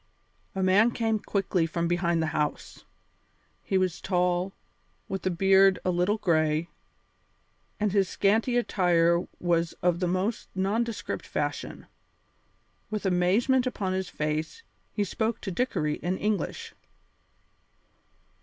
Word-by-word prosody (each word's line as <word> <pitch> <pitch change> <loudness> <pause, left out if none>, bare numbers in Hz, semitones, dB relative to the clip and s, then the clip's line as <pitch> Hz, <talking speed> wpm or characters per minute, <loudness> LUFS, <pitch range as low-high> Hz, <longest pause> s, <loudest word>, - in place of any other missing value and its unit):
A 190 - 0
man 195 +5 +5
came 225 -2 0
quickly 190 -5 0
from 170 +1 -1
behind 170 -1 +1
the 160 - -2
house. 150 -1 -3 0.8
He 190 - 0
was 185 -2 0
tall, 180 0 0 0.6
with 195 0 -4
a - - +3
beard 190 +1 +5
a 185 - +2
little 180 +5 +1
gray, 155 -3 +1 1.1
and 210 -1 +1
his 195 -1 +2
scanty 225 +5 +2
attire 175 -6 +2
was 170 -1 +1
of 175 -1 +2
the 180 - 0
most 185 +6 -1
nondescript 215 +5 -2
fashion. - - -3 1.0
With 215 -1 -4
amazement 200 +9 +2
upon 195 -6 -2
his 190 -1 -2
face, 155 - -3 0.3
he 205 - -1
spoke 225 +3 -2
to 195 - -4
Dickory 165 -8 -1
in 180 +2 -2
English. 210 -5 -2
185 Hz, 125 wpm, -27 LUFS, 175-210 Hz, 1.1 s, man